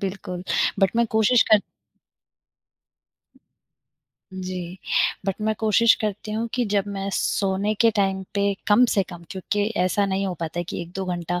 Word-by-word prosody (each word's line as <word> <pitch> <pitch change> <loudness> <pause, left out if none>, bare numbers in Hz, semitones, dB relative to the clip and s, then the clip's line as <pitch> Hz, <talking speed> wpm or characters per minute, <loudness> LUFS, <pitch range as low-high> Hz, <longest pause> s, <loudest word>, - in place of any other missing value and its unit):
बिल्कुल, 190 -2 -5 0.4
बट 195 - +4
मैं 235 0 +3
कोशिश 220 +2 +4
कर 215 -1 +7 2.7
जी। 185 -1 -6 0.5
बट 195 - +1
मैं 215 0 +1
कोशिश 220 +1 +4
करती 215 -1 -3
हूँ 225 +2 -1
कि 250 - +1
जब 200 -2 +2
मैं 195 -1 -4
सोने 200 +1 0
के 230 - +6
टाइम 195 -1 +1
पे 200 0 +2 0.2
कम 215 +4 +6
से 200 - +3
कम 175 -2 -10
क्योंकि 200 +2 -2 0.2
ऐसा 200 +2 +1
नहीं 195 0 -1
हो 185 - -3
पाता 165 +1 -4
है - - -4
कि 175 - -5
1-2 180 +3 -6
घंटा 175 +1 -3
195 Hz, 160 wpm, -23 LUFS, 185-215 Hz, 2.7 s, कर